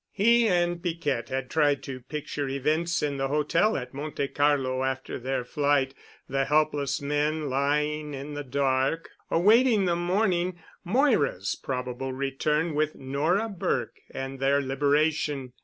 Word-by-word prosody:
He 235 Hz, +3 st, +4 dB
and 175 Hz, -2 st, +1 dB
Piquette 160 Hz, -8 st, -2 dB
had 130 Hz, 0 st, -2 dB
tried 145 Hz, -3 st, +2 dB
to 130 Hz, -1 st, -6 dB
picture 145 Hz, +1 st, -4 dB
events 155 Hz, +6 st, 0 dB
in 145 Hz, -2 st, -1 dB
the 135 Hz, 0 st, 0 dB
hotel 150 Hz, +9 st, +2 dB
at 125 Hz, 0 st, -6 dB
Monte 140 Hz, 0 st, -3 dB
Carlo 135 Hz, -3 st, +1 dB
after 130 Hz, 0 st, -3 dB
their 130 Hz, 0 st, -2 dB
flight: 140 Hz, 0 st, +1 dB, 0.3 s
The 135 Hz, 0 st, 0 dB
helpless 145 Hz, -2 st, +1 dB
men 150 Hz, 0 st, 0 dB
lying 150 Hz, +2 st, 0 dB
in 140 Hz, +2 st, -7 dB
the 145 Hz, 0 st, -4 dB
dark, 135 Hz, +3 st, 0 dB, 0.2 s
awaiting 215 Hz, +4 st, +4 dB
the 175 Hz, -1 st, +2 dB
morning, 180 Hz, 0 st, 0 dB, 0.3 s
Moira's 195 Hz, -, +2 dB
probable 130 Hz, 0 st, -4 dB
return 150 Hz, +4 st, 0 dB
with 155 Hz, +1 st, 0 dB
Nora 155 Hz, +11 st, 0 dB
Burke 195 Hz, -5 st, -2 dB
and 135 Hz, 0 st, -6 dB
their 140 Hz, +1 st, +3 dB
liberation. 145 Hz, -1 st, 0 dB
145 Hz, 140 wpm, -27 LUFS, 135-165 Hz, 0.3 s, He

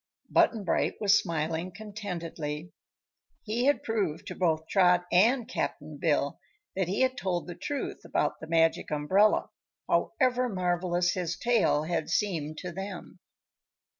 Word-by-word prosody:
Button 220 Hz, -3 st, +3 dB
Bright 175 Hz, -, 0 dB
was 205 Hz, -1 st, +5 dB
smiling 165 Hz, +1 st, -2 dB
contentedly. 175 Hz, -7 st, -6 dB, 0.7 s
He 230 Hz, +3 st, -1 dB
had 285 Hz, +1 st, +3 dB
proved 200 Hz, -9 st, -1 dB
to -, -, -6 dB
both 160 Hz, -3 st, 0 dB
Trot 180 Hz, -2 st, +4 dB
and 230 Hz, +6 st, +4 dB
Cap'n -, -, -4 dB
Bill -, -, +1 dB, 0.4 s
that 190 Hz, -2 st, 0 dB
he 190 Hz, +6 st, -1 dB
had 260 Hz, 0 st, +2 dB
told 185 Hz, -7 st, -2 dB
the 175 Hz, -, -6 dB
truth 290 Hz, -, -4 dB
about -, -, -1 dB
the 160 Hz, -, -8 dB
Magic 165 Hz, 0 st, +2 dB
Umbrella, 185 Hz, +8 st, +2 dB, 0.4 s
however 255 Hz, -2 st, +1 dB
marvelous 175 Hz, -2 st, 0 dB
his 175 Hz, -2 st, -2 dB
tale 230 Hz, -11 st, +2 dB
had 160 Hz, -1 st, -2 dB
seemed 165 Hz, -6 st, -1 dB
to 180 Hz, -, -5 dB
them. 190 Hz, +1 st, -7 dB
180 Hz, 135 wpm, -29 LUFS, 165-215 Hz, 0.7 s, was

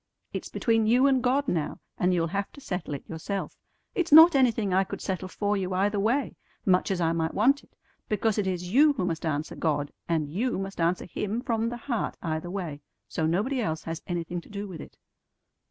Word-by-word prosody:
It's -, -, -4 dB
between 225 Hz, -2 st, +1 dB
you 245 Hz, +4 st, +5 dB
and 265 Hz, -2 st, +4 dB
God 265 Hz, +3 st, +1 dB
now, 160 Hz, -, -1 dB, 0.2 s
and 180 Hz, -, +1 dB
you'll 170 Hz, -2 st, +2 dB
have 195 Hz, +4 st, -3 dB
to -, -, -12 dB
settle 180 Hz, -, -4 dB
it 140 Hz, -, -9 dB
yourself. 190 Hz, +5 st, -4 dB, 0.4 s
It's 355 Hz, -3 st, -1 dB
not 325 Hz, +3 st, +10 dB
anything 230 Hz, -7 st, +3 dB
I 190 Hz, +1 st, +4 dB
could -, -, -6 dB
settle 185 Hz, -1 st, -3 dB
for 205 Hz, +2 st, -1 dB
you 185 Hz, -2 st, -2 dB
either 200 Hz, +2 st, +1 dB
way, 235 Hz, +5 st, 0 dB, 0.3 s
much 185 Hz, -2 st, +3 dB
as 190 Hz, -2 st, 0 dB
I 165 Hz, -1 st, +2 dB
might 160 Hz, -1 st, -1 dB
want 270 Hz, +7 st, +3 dB
it, -, -, -26 dB, 0.3 s
because 215 Hz, 0 st, +1 dB
it 200 Hz, -, 0 dB
is 180 Hz, -1 st, -3 dB
you 295 Hz, +3 st, +6 dB
who 215 Hz, -10 st, -2 dB
must 165 Hz, -1 st, -2 dB
answer 150 Hz, 0 st, -2 dB
God, 145 Hz, -3 st, -1 dB, 0.2 s
and 160 Hz, -3 st, +1 dB
you 215 Hz, -, -1 dB
must 195 Hz, -2 st, -4 dB
answer 170 Hz, +2 st, +1 dB
Him 210 Hz, +4 st, -3 dB
from 230 Hz, -3 st, 0 dB
the 240 Hz, -, -5 dB
heart 240 Hz, -1 st, -3 dB
either 160 Hz, +1 st, -2 dB
way; 175 Hz, -6 st, -4 dB, 0.3 s
so 160 Hz, -, -1 dB
nobody 220 Hz, +11 st, 0 dB
else 160 Hz, -7 st, -2 dB
has 165 Hz, 0 st, -5 dB
anything 175 Hz, 0 st, -3 dB
to -, -, -18 dB
do 205 Hz, -1 st, -5 dB
with 175 Hz, -5 st, -8 dB
it." -, -, -12 dB
195 Hz, 215 wpm, -27 LUFS, 170-230 Hz, 0.4 s, not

